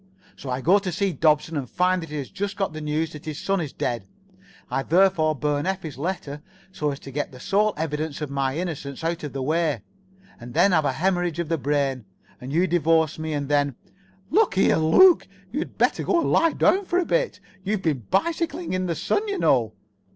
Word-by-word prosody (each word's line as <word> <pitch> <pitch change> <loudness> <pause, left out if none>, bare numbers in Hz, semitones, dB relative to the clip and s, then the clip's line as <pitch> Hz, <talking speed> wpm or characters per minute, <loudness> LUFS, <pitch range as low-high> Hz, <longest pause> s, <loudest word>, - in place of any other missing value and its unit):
So 135 - -8
I 125 +1 -2
go 185 +8 +5
to 190 -2 -4
see 195 +1 0
Dobson 155 0 +2
and 135 -5 -3
find 180 +1 +1
that 165 - -8
he 150 - -5
has 140 -3 -5
just 200 0 -4
got 195 -5 -1
the 155 - -6
news 150 +1 -1
that 150 - -10
his 155 -2 -5
son 195 +1 0
is 150 -4 -4
dead. 120 -5 -3 0.6
I 135 +2 0
therefore 165 -1 +3
burn 145 +2 -1
Effie's 180 -7 -3
letter 150 -3 -4 0.3
so 150 -6 -2
as 140 -1 -4
to 135 - -9
get 145 +2 -3
the 125 - -12
sole 210 +8 +1
evidence 155 -1 -3
of 150 -3 -4
my 135 0 -1
innocence 160 -5 -5
out 165 0 -2
of 150 - -5
the 135 -1 -3
way, 155 +1 0 0.6
and 120 0 -10
then 200 - +5
have 160 -4 +3
a 140 - +2
hæmorrhage 175 -1 0
of 170 -2 -3
the 165 -2 0
brain. 135 -3 0 0.4
And 130 +2 -6
you 170 +5 +3
divorce 165 -3 +2
me, 160 0 -3
and 145 -1 -2
then——" 145 -2 +1 0.6
"Look 420 - +3
here, 190 - +4
Luke, 330 - +6 0.2
you'd 295 +7 -4
better - - +2
go 345 - +2
and - - 0
lie 330 -1 +4
down 390 +2 +3
for 355 - 0
a 365 - +3
little. - - 0 0.2
You've 200 0 -1
been 135 - -1
bicycling 315 - -1
in 185 0 -1
the 170 - -1
sun, 210 - -1
you 400 -1 -2
know." 120 - +2
160 Hz, 215 wpm, -24 LUFS, 145-190 Hz, 0.6 s, Luke